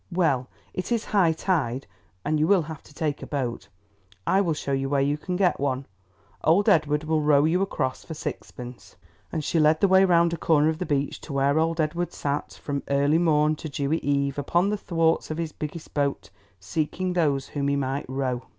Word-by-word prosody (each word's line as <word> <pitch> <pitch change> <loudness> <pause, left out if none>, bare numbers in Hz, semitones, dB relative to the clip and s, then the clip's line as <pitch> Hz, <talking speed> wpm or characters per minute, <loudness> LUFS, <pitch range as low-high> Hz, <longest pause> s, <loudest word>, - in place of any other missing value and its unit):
Well, 150 -8 +1 0.3
it 185 - -4
is 230 -2 0
high 190 -6 +3
tide, 150 -7 -1 0.4
and 155 0 +1
you 155 - +3
will 195 -3 +4
have 155 -1 -8
to - - -16
take 150 -3 -2
a - - -7
boat. 130 -5 -3 0.6
I 195 - +3
will 170 -5 0
show 140 - -4
you 135 0 0
where 140 0 +2
you 140 +2 +2
can 180 +4 -4
get 180 -1 +2
one. 135 -1 -1 0.6
Old 190 +7 +4
Edward 155 -6 +3
will 155 0 +1
row 145 -1 +4
you 175 +4 +2
across 130 -9 -2
for 160 - -7
sixpence," 125 -4 -7 0.4
and 155 - -2
she 165 - +1
led 155 +1 +4
the 200 - +4
way 190 0 +6
round 170 -2 +4
a - - -2
corner 155 -1 +3
of 160 0 -2
the 180 - -3
beach 140 -1 -1
to 150 - -8
where 140 +2 +2
old 165 +1 0
Edward 170 +3 -1
sat, 145 0 -3
from 140 -1 -2
early 140 +3 +3
morn 155 -2 +3
to 155 - -6
dewy 145 +3 -1
eve, 140 0 0
upon 175 +7 +1
the - - +1
thwarts 165 -4 +1
of 155 - -3
his 165 -2 -3
biggest 155 +2 -7
boat, 140 -6 -1 0.3
seeking 160 - -2
those 145 -6 +1
whom 140 -1 -2
he 140 - +2
might 135 -1 -2
row. 130 -2 -2
155 Hz, 210 wpm, -25 LUFS, 140-170 Hz, 0.6 s, way